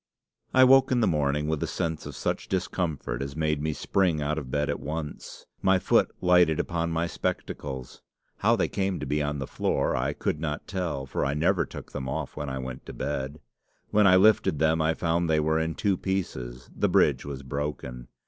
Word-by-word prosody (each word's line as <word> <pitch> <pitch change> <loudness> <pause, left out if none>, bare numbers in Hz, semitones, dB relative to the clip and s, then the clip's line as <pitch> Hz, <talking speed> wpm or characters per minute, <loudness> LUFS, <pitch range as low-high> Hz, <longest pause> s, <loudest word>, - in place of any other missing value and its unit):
"I 130 - +6
woke 135 +1 +6
in 125 - +3
the 115 - +3
morning 75 -3 +1
with 80 -1 -1
a - - 0
sense 80 -2 -3
of - - -8
such - - -2
discomfort 85 -9 -2
as 70 +1 -5
made 75 -2 0
me 80 +1 0
spring 90 +1 +1
out 75 +1 -1
of 65 -4 -8
bed 75 +2 0
at 70 - -2
once. 75 0 -6 0.2
My 95 0 +4
foot - - +3
lighted 90 -3 +4
upon 85 -1 -1
my 80 0 0
spectacles. 65 -5 -4 0.4
How - - +3
they - - +1
came 95 -2 -1
to - - -4
be 75 +1 0
on 75 0 -1
the 70 - -3
floor - - 0
I - - 0
could 75 - -2
not 75 -2 -4
tell, 85 -8 -3
for 65 - -2
I 70 +1 0
never 80 +3 +2
took - - -9
them 65 -1 -4
off - - -4
when 75 -2 -4
I 65 - -3
went 65 -1 -6
to - - -7
bed. 70 +1 -4 0.5
When 105 -1 +5
I 90 - +7
lifted 100 -5 +4
them 80 +1 +2
I 80 +1 +2
found 85 0 0
they 80 -1 +3
were 80 +1 +2
in 80 0 -1
two 100 -3 +1
pieces; 65 -12 -3
the - - +1
bridge - - +3
was 70 -1 -6
broken. 65 -3 -4
75 Hz, 210 wpm, -27 LUFS, 70-85 Hz, 0.5 s, I